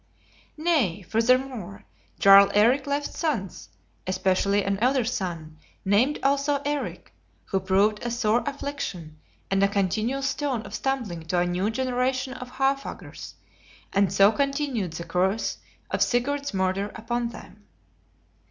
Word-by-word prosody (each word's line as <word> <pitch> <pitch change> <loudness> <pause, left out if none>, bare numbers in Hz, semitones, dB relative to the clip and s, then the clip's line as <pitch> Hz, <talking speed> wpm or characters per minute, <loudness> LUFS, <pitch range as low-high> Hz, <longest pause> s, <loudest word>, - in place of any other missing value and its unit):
Nay, 290 - +1
furthermore, 225 -2 0 0.3
Jarl 195 0 +8
Eric 245 +7 +4
left 285 +1 -2
sons, 240 - -3 0.4
especially 190 +2 +1
an 195 0 -1
elder 255 +1 +2
son, 170 -9 -4 0.3
named 225 +10 +3
also 280 +1 +2
Eric, 290 0 -4 0.3
who 195 - -1
proved 195 +3 +2
a 240 - -3
sore 235 0 +1
affliction, 275 - -5 0.3
and 195 0 +2
a 200 - +5
continual 215 +7 -1
stone 265 -3 -1
of - - -10
stumbling 240 -11 -2
to 180 - 0
a 175 - +3
new 180 +4 0
generation 255 +2 -1
of 250 -1 -9
Haarfagrs, 270 +1 -3 0.6
and 200 -2 +3
so 195 +2 +5
continued 275 - -1
the 170 - -5
curse 185 +5 -1 0.3
of - - -1
Sigurd's 280 +4 0
murder 190 +1 -1
upon 235 +1 -2
them. 235 - -13
225 Hz, 130 wpm, -25 LUFS, 195-270 Hz, 0.6 s, Jarl